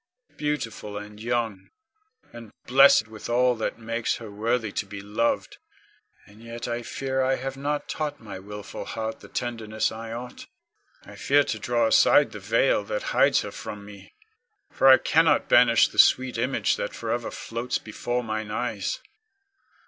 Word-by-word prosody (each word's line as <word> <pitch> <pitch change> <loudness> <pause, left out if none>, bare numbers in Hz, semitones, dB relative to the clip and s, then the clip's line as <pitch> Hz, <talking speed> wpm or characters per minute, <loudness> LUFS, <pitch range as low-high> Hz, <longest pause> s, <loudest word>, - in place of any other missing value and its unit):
Beautiful 115 -8 -4
and 105 +1 -9
young, 115 -4 -2 0.6
and 115 -2 -10 0.2
blessed 130 -4 +6
with 110 +1 -9
all 125 +1 +3
that 110 - -3
makes 115 0 -2
her 110 -3 -9
worthy 110 +1 -1
to 100 - -3
be 100 0 -8
loved, 105 +4 -2 0.7
and 105 +2 -18
yet 115 0 -7
I 120 0 -3
fear 130 +2 -3
I 130 0 +2
have 135 +1 -5
not 145 +2 -3
taught 155 -2 -4
my 100 -4 -9
wilful 105 +1 -8
heart 110 0 -5
the - - -13
tenderness 115 -3 -2
I 115 0 -7
ought. 120 +2 -8 0.6
I - - -12
fear 145 +1 +3
to - - -4
draw 120 -2 +1
aside 110 - +5
the - - -8
veil - - +2
that - - -3
hides - - +4
her - - -6
from 105 -1 -8
me, 100 - -14 0.6
for 135 - +2
I 130 -1 +9
cannot 160 -2 +3
banish 115 -3 +5
the - - -5
sweet 130 -1 +5
image 125 +3 0
that - - -4
forever - - -3
floats 115 +2 -4
before 120 +3 -4
mine 110 -1 -4
eyes. 120 - -3
115 Hz, 165 wpm, -25 LUFS, 110-125 Hz, 0.7 s, I